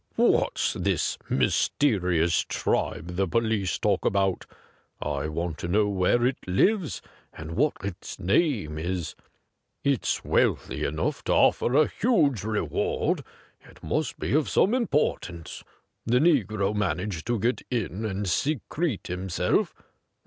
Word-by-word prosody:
What's - - +2
this - - -1
mysterious 90 - +2
tribe 90 +1 -1
the 95 0 +1
police 110 -1 0
talk - - +1
about 95 -2 +1 0.3
.'' - - -37 0.2
I 75 0 -2
want 85 +1 -3
to - - -4
know 105 +3 +2
where 100 +5 +2
it 130 - 0
lives 170 - +1 0.3
and 80 +1 -8
what 145 - +2
its 100 -3 -6
name 100 - +1
is. 85 0 -3 0.7
It's 140 -4 0
wealthy - - +1
enough 75 +2 -2
to - - +2
offer 125 - +3
a 155 +1 +6
huge 150 - +1
reward; 110 0 -1 0.4
it - - -19
must - - -1
be - - -2
of 150 0 +2
some 195 - +3
impor 235 - +1
tance. 85 -2 -9 0.4
The 120 +2 +3
negro 110 - +2
managed 95 -3 -2
to 120 -1 +1
get 120 +5 0
in 110 -4 -2
and 100 -2 -2
secrete 145 - -1
himself. 90 0 -1
100 Hz, 135 wpm, -26 LUFS, 90-130 Hz, 0.7 s, a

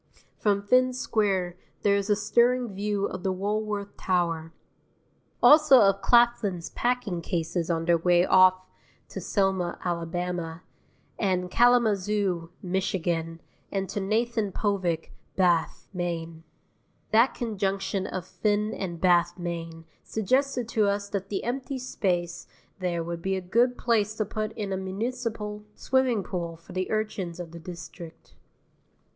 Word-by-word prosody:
From 200 -1 +1
Finn 255 +4 +3
Square 195 -7 0 0.3
there 200 -1 +4
is 200 +1 -1
a 210 - +5
stirring 235 +2 +2
view 200 0 -1
of 185 - -5
the 190 0 0
Woolworth 205 +1 -2
Tower. 165 -3 0 0.9
Also 305 -3 +8
of 195 -2 +4
Claflin's 235 -7 +3
packing 240 -8 -1
cases 170 0 -2
on 165 -1 0
their 170 0 +3
way 175 +1 +4
off 185 0 +5 0.4
to - - -6
Selma, 190 -3 0
Ala., 175 0 -3 0.6
and 180 -3 0
Kalamazoo, 210 -7 +2
Mich., 190 +2 -1
and 165 -1 -1 0.5
to - - -3
Nathan 220 +1 0
Povich, 185 -6 -1 0.2
Bath, 175 -3 +1
Me. 170 -2 -4 0.7
That 230 +4 +4
conjunction 195 -4 -2
of 185 -2 -5
Finn 210 0 0
and 175 -3 -5
Bath, 175 -1 +3
Me., 165 -2 -5 0.2
suggested 255 +3 0
to 215 -3 +2
us 200 0 -1
that 195 -1 -4
the 200 - -2
empty 265 +3 -3
space 175 -8 -2 0.3
there 175 -2 -1
would 170 0 -5
be 190 +2 -1
a - - -1
good 235 +7 +2
place 215 -3 +1
to 215 - -1
put 215 +1 -3
in 205 -3 -4
a - - -1
municipal 210 +1 -4
swimming 260 -5 +1
pool 170 -3 -4
for 165 - -14
the 185 0 -2
urchins 205 -5 -2
of 170 -2 -7
the 170 - -9
district. 170 0 -10
195 Hz, 135 wpm, -27 LUFS, 175-215 Hz, 0.9 s, Also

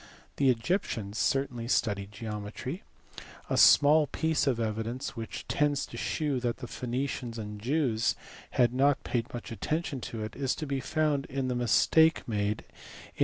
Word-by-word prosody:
The 140 -2 +4
Egyptians 115 - -1
certainly 130 -4 0
studied 100 -4 0
geometry. 105 - -5 0.7
A - - +2
small 150 +1 +7
piece 160 +1 0
of 125 -4 +2
evidence 115 +5 -3
which 115 -1 -6
tends 145 -1 +1
to - - -11
shew 145 -4 -1
that 120 -1 -1
the - - -7
Phoenicians 125 -1 -3
and 105 -1 -6
Jews 125 -3 +1 0.4
had 120 -1 +4
not 140 +2 +3
paid 120 +1 -2
much 120 -1 -7
attention 150 +3 -2
to 110 -2 -5
it 110 0 -6
is 135 -1 -1
to 155 - -4
be 140 -2 -2
found 150 -1 0
in 135 -1 -2
the 125 - -1
mistake 160 +7 +4
made 105 -1 -1 0.5
in - - -19
125 Hz, 160 wpm, -29 LUFS, 115-140 Hz, 0.7 s, small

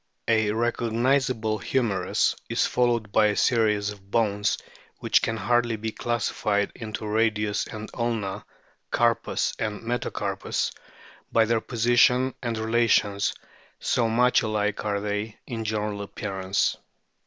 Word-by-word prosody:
A 110 -2 +3
recognisable 120 0 +1
humerus 100 -7 +1
is - - +2
followed 120 -4 +1
by 105 0 +4
a 105 - 0
series 105 -4 +2
of 100 -1 -13
bones 105 -2 +1 0.4
which - - +3
can 115 - -1
hardly 120 +2 +1
be 110 +1 -4
classified 105 -3 -1
into 110 -1 -6
radius 105 -1 +1
and 110 0 -7
ulna, 115 -5 -2 0.5
carpus 120 -1 +1
and 105 -1 -3
metacarpus, 120 +2 -2 0.6
by 115 - +4
their 115 0 +1
position 120 +2 +3
and 115 -2 -2
relations, 110 -3 +2 0.4
so 115 -2 +1
much 125 +2 +4
alike 105 -2 -1
are 100 -1 -1
they 105 +1 -3
in 115 -3 -4
general 105 -1 -2
appear 100 -1 -5
ance. 95 +1 +1
110 Hz, 125 wpm, -26 LUFS, 105-120 Hz, 0.6 s, by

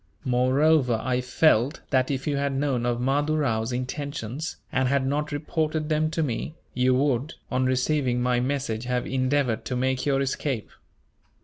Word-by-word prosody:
Moreover, 130 0 +3
I 125 +1 0
felt 130 +1 +2
that 130 -2 +2
if 135 -1 -2
you 145 - 0
had 140 0 0
known 135 -4 0
of 120 -1 0
Mahdoo 145 +4 +1
Rao's 115 -6 0
intentions, 130 +2 -4
and 130 0 +1
had 140 0 +1
not 150 +3 -1
reported 155 +1 -1
them 155 0 +2
to 160 0 -1
me, 145 +3 -3 0.2
you 125 0 +3
would, 135 +1 0 0.2
on 130 0 +1
receiving 130 -1 +1
my 125 0 +2
message, 125 -3 -2
have 125 0 -1
endeavoured 130 -3 0
to 130 - -2
make 130 +1 0
your 140 -2 +2
escape. 135 -3 -2
130 Hz, 165 wpm, -25 LUFS, 125-145 Hz, 0.2 s, Moreover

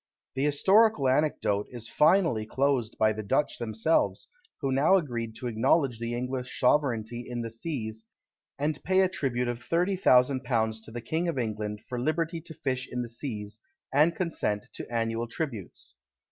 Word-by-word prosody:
The 135 - -1
historical 190 +2 +4
anecdote 130 -7 +1
is 120 -2 -7
finally 150 - +3
closed 130 0 0
by 110 0 +3
the 110 - -5
Dutch 135 +8 0
themselves, 110 - 0 0.3
who 135 -3 -1
now 140 +8 +4
agreed 120 -10 -2
to - - -8
acknowledge 120 +2 +2
the 115 0 -3
English 125 +1 -3
sovereignty 120 -4 +1
in 120 -1 -3
the 115 - -5
seas, 115 -4 -5 0.5
and 150 +1 -2
pay 190 0 +3
a 190 - +4
tribute 125 -8 -1
of 120 0 -3
thirty 175 +8 +1
thousand 130 -7 +4
pounds 110 -3 0
to - - -10
the 120 +1 -5
King 160 +9 -1
of 170 - -2
England, 105 -3 -3
for 125 -1 -4
liberty 165 +5 -1
to 160 0 -10
fish 130 -2 -2
in 125 0 -2
the 120 - -7
seas, 110 -4 -5 0.3
and 155 +4 +4
consented 160 - -2
to - - -8
annual 115 0 -1
tributes. 115 - -5
125 Hz, 170 wpm, -28 LUFS, 115-150 Hz, 0.5 s, historical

